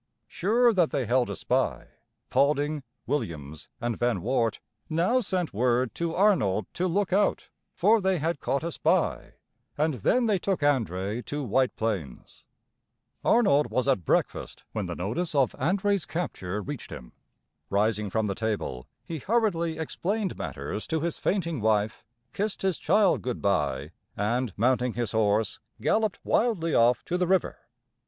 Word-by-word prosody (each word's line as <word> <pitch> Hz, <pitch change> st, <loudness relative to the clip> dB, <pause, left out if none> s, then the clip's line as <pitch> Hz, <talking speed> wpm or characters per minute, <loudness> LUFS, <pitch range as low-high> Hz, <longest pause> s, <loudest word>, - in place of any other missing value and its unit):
] -, -, -51 dB
Sure 230 Hz, +6 st, +3 dB
that 175 Hz, -5 st, +3 dB
they 130 Hz, -, -1 dB
held 125 Hz, +2 st, +2 dB
a -, -, -3 dB
spy, -, -, -1 dB, 0.4 s
Paulding, 145 Hz, +1 st, +2 dB, 0.2 s
Williams, 80 Hz, -, -4 dB
and 120 Hz, -1 st, -2 dB
Van 120 Hz, -7 st, 0 dB
Wart 115 Hz, -2 st, +1 dB, 0.3 s
now 175 Hz, +11 st, +2 dB
sent 185 Hz, -7 st, -2 dB
word 125 Hz, +2 st, +1 dB
to 170 Hz, -1 st, -2 dB
Arnold 135 Hz, -, +3 dB
to 185 Hz, -, 0 dB
look 190 Hz, +1 st, 0 dB
out, 205 Hz, +1 st, +1 dB, 0.3 s
for 215 Hz, +4 st, +4 dB
they 190 Hz, -1 st, +2 dB
had 160 Hz, 0 st, -1 dB
caught 140 Hz, +3 st, -1 dB
a 170 Hz, -, -2 dB
spy, -, -, 0 dB, 0.4 s
and 155 Hz, +1 st, +2 dB
then 235 Hz, -, +2 dB
they 210 Hz, -4 st, +2 dB
took 190 Hz, -1 st, -1 dB
André 115 Hz, -6 st, 0 dB
to 145 Hz, 0 st, -3 dB
White 130 Hz, +2 st, +1 dB
Plains. 95 Hz, -, -4 dB, 0.8 s
Arnold 150 Hz, -12 st, +4 dB
was 130 Hz, +1 st, 0 dB
at 130 Hz, -10 st, +2 dB
breakfast -, -, -1 dB
when 105 Hz, -4 st, -3 dB
the 85 Hz, -, -4 dB
notice 150 Hz, -, -3 dB
of 135 Hz, -3 st, +3 dB
André's 200 Hz, +1 st, 0 dB
capture 105 Hz, -, -3 dB
reached 145 Hz, -4 st, -6 dB
him. 60 Hz, -1 st, -9 dB, 0.6 s
Rising 105 Hz, +1 st, +1 dB
from 110 Hz, +3 st, 0 dB
the 100 Hz, -, -1 dB
table, 105 Hz, -, -3 dB, 0.2 s
he 165 Hz, -2 st, -5 dB
hurriedly 180 Hz, -, 0 dB
explained 190 Hz, +5 st, -2 dB
matters 70 Hz, +10 st, -5 dB
to 160 Hz, -1 st, -1 dB
his 170 Hz, 0 st, -2 dB
fainting 170 Hz, -, -1 dB
wife, 110 Hz, 0 st, +1 dB, 0.3 s
kissed 205 Hz, 0 st, -2 dB
his 190 Hz, -4 st, 0 dB
child 200 Hz, +2 st, +3 dB
good 125 Hz, -2 st, -3 dB
by, 75 Hz, -7 st, 0 dB, 0.3 s
and, 115 Hz, +3 st, 0 dB
mounting 125 Hz, +1 st, +2 dB
his 120 Hz, -3 st, -2 dB
horse, 110 Hz, -1 st, +1 dB, 0.2 s
galloped 215 Hz, -2 st, +1 dB
wildly 190 Hz, -9 st, +1 dB
off 120 Hz, +1 st, +4 dB
to 180 Hz, +1 st, -1 dB
the 180 Hz, -, +1 dB
river. 190 Hz, -1 st, +1 dB
140 Hz, 155 wpm, -27 LUFS, 110-180 Hz, 0.8 s, for